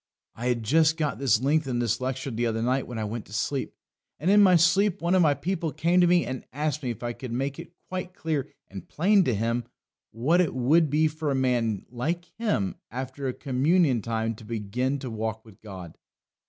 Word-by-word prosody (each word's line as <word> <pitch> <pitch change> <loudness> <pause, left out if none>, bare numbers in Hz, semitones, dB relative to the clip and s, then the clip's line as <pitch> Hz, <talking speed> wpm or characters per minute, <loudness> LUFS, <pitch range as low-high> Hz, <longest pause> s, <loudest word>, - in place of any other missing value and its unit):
I 120 +2 -4
had 120 -2 0
just 160 +6 +3
got 150 -8 -1
this 130 -4 +3
length 150 +2 +2
in 125 -2 -1
this 120 -1 0
lecture 130 +1 -3
the 120 +1 -1
other 115 0 -1
night 130 +2 0
when 120 - -6
I 110 - -2
went 110 +1 -5
to 105 - -13
sleep. 130 +5 -2 0.4
And 175 +6 +2
in 205 0 +7
my 185 -3 +6
sleep 185 +3 +3
one 170 +3 0
of 185 - +5
my 150 -4 +4
people 165 +2 -2
came 170 +4 +2
to 175 - +5
me 175 0 +4
and 130 -1 -5
asked 150 +2 -2
me 130 - -3
if 120 0 -5
I 120 0 -2
could 125 0 -8
make 135 +3 -2
it 175 - -10
quite 185 -1 -5
clear 150 -2 -2 0.2
and 95 -2 -10
plain 195 +5 +3
to 125 - +1
him 115 +3 -1 0.4
what 150 +11 +2
it 170 - -1
would 150 +6 +3
be 155 +3 +3
for 155 0 -3
a 140 - +1
man 120 -6 0
like 160 +8 -2
him 205 - 0
after 130 +3 -5
a 130 - -1
communion 140 0 +2
time 115 +1 -2
to - - -13
begin 115 +5 -2
to 130 -3 -6
walk 110 0 -4
with 110 -3 -17
God. 95 -6 -10
130 Hz, 220 wpm, -26 LUFS, 115-160 Hz, 0.4 s, in